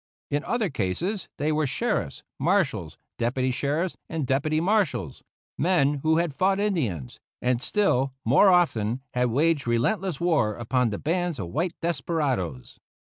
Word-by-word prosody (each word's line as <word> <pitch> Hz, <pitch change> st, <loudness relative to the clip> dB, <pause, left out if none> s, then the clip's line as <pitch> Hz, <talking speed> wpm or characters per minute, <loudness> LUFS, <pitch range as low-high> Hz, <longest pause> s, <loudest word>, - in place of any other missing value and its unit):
In 145 Hz, +1 st, 0 dB
other 225 Hz, -7 st, 0 dB
cases 165 Hz, -, -2 dB
they 150 Hz, +2 st, 0 dB
were 155 Hz, -1 st, +1 dB
sheriffs, 215 Hz, -, -2 dB, 0.2 s
marshals, 135 Hz, -, 0 dB, 0.2 s
deputy 130 Hz, +2 st, 0 dB
sheriffs, 150 Hz, +8 st, -1 dB
and 160 Hz, -4 st, -2 dB
deputy 145 Hz, +4 st, +1 dB
marshals 200 Hz, +3 st, 0 dB, 0.4 s
men 150 Hz, -4 st, +2 dB
who 160 Hz, +2 st, +3 dB
had 170 Hz, -3 st, 0 dB
fought 190 Hz, +7 st, +2 dB
Indians, 125 Hz, -, -2 dB, 0.2 s
and 125 Hz, -1 st, 0 dB
still 135 Hz, -11 st, +1 dB
more 140 Hz, -, +6 dB
often 130 Hz, -, +2 dB
had 125 Hz, 0 st, +2 dB
waged 145 Hz, +2 st, +1 dB
relentless 150 Hz, -, 0 dB
war 150 Hz, -12 st, +2 dB
upon 120 Hz, +1 st, 0 dB
the 105 Hz, -, -3 dB
bands 175 Hz, -, -1 dB
of 90 Hz, -5 st, -5 dB
white 165 Hz, -, -1 dB
desperadoes. 135 Hz, -, -2 dB
145 Hz, 140 wpm, -26 LUFS, 125-175 Hz, 0.4 s, more